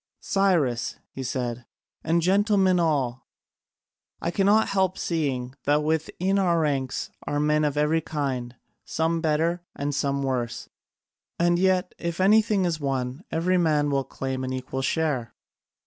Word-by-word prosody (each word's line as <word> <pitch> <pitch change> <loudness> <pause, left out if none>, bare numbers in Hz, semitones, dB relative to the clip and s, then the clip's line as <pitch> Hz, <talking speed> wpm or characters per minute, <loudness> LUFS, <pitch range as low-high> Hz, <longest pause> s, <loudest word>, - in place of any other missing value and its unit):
"Cyrus," 165 -12 +1
he 135 - -7
said, 125 -2 -3 0.4
"and 165 +1 +1
gentlemen 195 -1 +3
all, 135 -7 0 0.9
I 170 - -2
cannot 205 +4 +3
help 190 -2 +1
seeing 135 -7 -2
that 150 +1 +3
within 165 +5 0
our 175 -3 +2
ranks 135 -4 -1 0.2
are 145 - 0
men 150 +1 +2
of 145 -1 0
every 150 +2 +2
kind, 130 -6 -3 0.3
some 165 +1 -1
better 165 +2 +1
and 145 +1 -2
some 140 0 0
worse, 125 -3 -2 0.7
and 175 0 +2
yet 185 -1 +2
if 170 0 -3
anything 210 0 +4
is 165 -3 -1
won 135 +1 -2
every 180 +3 +1
man 150 -3 +2
will 135 -1 +1
claim 130 0 -4
an 130 - -3
equal 130 +1 -4
share. 135 -4 -1
155 Hz, 140 wpm, -25 LUFS, 135-175 Hz, 0.9 s, anything